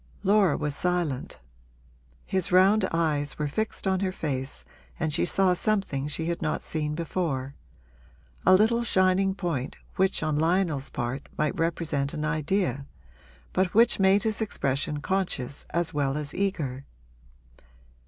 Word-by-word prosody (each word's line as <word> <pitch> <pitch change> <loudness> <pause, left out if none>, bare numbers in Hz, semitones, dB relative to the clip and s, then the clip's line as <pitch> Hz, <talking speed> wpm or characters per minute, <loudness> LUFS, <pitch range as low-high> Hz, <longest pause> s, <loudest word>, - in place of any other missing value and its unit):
Laura 200 -5 +4
was 150 -1 -2
silent; 175 -7 -1 0.9
his 190 -2 -1
round 190 +3 +5
eyes 150 -3 0
were 150 - -1
fixed 215 +11 -3
on 190 -1 +2
her 190 -1 0
face 135 -6 -4 0.3
and 160 -3 -1
she - - +2
saw 185 0 +3
something 180 -8 0
she 155 +2 -3
had 170 0 -2
not 155 -2 -1
seen 150 -1 -2
before 150 -5 -2 0.9
a 185 - +7
little 225 +4 +3
shining 190 -2 +2
point 165 -9 -3 0.2
which 190 0 +2
on 155 -1 0
Lionel's 165 -4 +1
part 130 0 -4
might 150 -2 0
represent 160 -4 -1
an 150 - -2
idea, 155 -3 -1 0.7
but 185 0 +1
which 230 -1 +5
made 195 +1 +4
his 220 -1 0
expression 145 -7 -1
conscious 160 -8 -2
as 170 0 -1
well 140 -1 0
as 150 -1 -4
eager. 155 -10 -2
165 Hz, 140 wpm, -27 LUFS, 145-190 Hz, 0.9 s, a